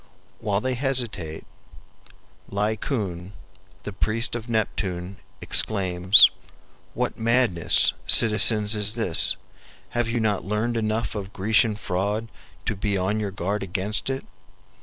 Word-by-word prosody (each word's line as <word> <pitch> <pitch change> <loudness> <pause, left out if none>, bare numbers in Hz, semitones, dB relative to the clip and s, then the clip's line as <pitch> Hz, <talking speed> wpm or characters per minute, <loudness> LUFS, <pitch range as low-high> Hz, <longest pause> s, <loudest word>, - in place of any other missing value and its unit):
While 100 -1 -1
they 130 0 -2
hesitate, 120 - -2 1.0
Laocoon, 100 -3 -3 0.5
the 105 - -7
priest 115 +4 -2
of 120 0 -6
Neptune 95 -4 -3 0.2
exclaims, 95 -1 +4 0.6
"What - - -3
madness, 115 -7 +3
citizens, 105 -1 +6
is 105 0 -1
this? 110 -8 +1 0.5
Have 120 -1 -2
you 120 +1 -1
not 105 -3 -1
learned 105 +4 -2
enough 110 -1 -2
of 100 -2 -7
Grecian 105 +2 +1
fraud 105 +3 -3 0.4
to 110 - -2
be 100 0 -2
on 95 +4 -1
your 105 -2 -3
guard 100 +2 -3
against 100 +5 -3
it? 135 0 -4
105 Hz, 115 wpm, -23 LUFS, 95-115 Hz, 1.0 s, citizens